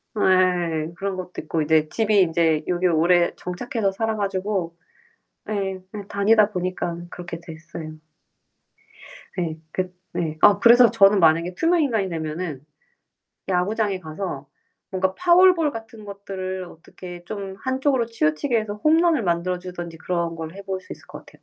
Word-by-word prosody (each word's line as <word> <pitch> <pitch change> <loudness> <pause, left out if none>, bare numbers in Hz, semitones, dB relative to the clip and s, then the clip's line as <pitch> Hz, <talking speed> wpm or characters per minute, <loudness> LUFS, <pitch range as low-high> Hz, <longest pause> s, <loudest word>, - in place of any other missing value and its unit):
예. 180 -5 +2
그런 195 +1 -3
것도 180 -1 -6
있고 160 +1 -2
이제 155 0 +3
집이 215 -1 +2
이제 160 -2 +1
여기 180 +1 +1
오래 175 +1 +3
정착해서 200 +2 -2
살아 220 +2 -2
가지고 195 -3 -2 0.7
예. 195 -2 -2 0.3
다니다 210 +1 +3
보니까 180 -2 -3
그렇게 170 -2 -7
됐어요. 160 -1 -9 1.5
네, 165 -3 -2
그 185 +1 -3 0.2
네, 160 -2 -2
아 205 -1 +6
그래서 240 +2 +7
저는 200 -3 +5
만약에 170 +2 +3
투명 335 +1 +2
인간이 225 -9 0
되면은 155 -3 -4 0.8
야구장에 195 +1 0
가서 155 -3 -6 0.4
뭔가 190 0 0
파울볼 350 -3 +5
같은 225 -1 -9
것들을 190 -2 -6
어떻게 175 +1 -11
좀 195 0 -6
한쪽으로 260 -2 0
치우치게 230 - 0
해서 215 -1 -3
홈런을 315 +3 +3
만들어 175 0 0
주든지 175 -2 -8
그런 170 -1 -2
걸 160 +1 -7
해볼 195 -1 -5
수 - - -10
있을 - - -13
것 - - -11
같아요. - - -19
185 Hz, 310 characters per minute, -23 LUFS, 170-210 Hz, 1.5 s, 그래서